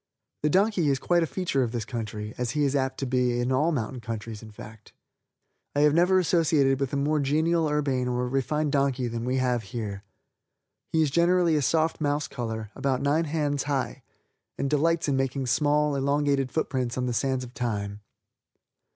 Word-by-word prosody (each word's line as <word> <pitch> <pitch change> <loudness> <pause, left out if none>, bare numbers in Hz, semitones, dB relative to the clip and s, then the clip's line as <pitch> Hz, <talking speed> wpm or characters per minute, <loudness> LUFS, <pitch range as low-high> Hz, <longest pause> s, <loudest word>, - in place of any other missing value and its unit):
The 150 - +2
donkey 190 -2 +2
is 135 - +2
quite 175 +5 +2
a 165 - +1
feature 175 -8 -1
of 120 -3 0
this 115 -3 -3
country 110 -2 -5
as 125 -1 -2
he 150 - +3
is 140 0 +1
apt 135 -1 0
to - - 0
be 125 -1 +1
of 120 +1 0
all 150 +6 +2
mountain 125 -3 -3
countries 110 -1 -6
in 110 - -11
fact. 105 0 -13 0.8
I 145 - +3
have 150 0 +5
never 180 +3 +4
associated 155 -6 +3
with 140 -2 -1
a - - -2
more 150 +2 +1
genial 160 +4 +1
urbane 140 -4 0
or 125 0 -1
refined 140 +3 0
donkey 135 -3 +1
than 115 0 -4
we 130 +1 0
have 125 -2 +1
here. 105 -2 -6 0.9
He 160 -1 +3
is 145 - 0
generally 170 +1 +3
a 150 - +2
soft 160 +4 +1
mouse 145 0 0
color, 110 -4 -5
about 135 -1 -1
nine 150 +4 +2
hands 145 -2 -1
high, 140 -2 -2 0.6
and 140 - -2
delights 165 +3 +2
in 140 - +1
making 135 0 -1
small, 150 +3 +2
elongated 140 -1 +1
foot 160 - 0
prints 125 -3 -2
on 125 - 0
the 125 - -1
sands 130 +1 0
of 125 0 -10
time. 105 -6 -3
135 Hz, 195 wpm, -26 LUFS, 125-150 Hz, 0.9 s, have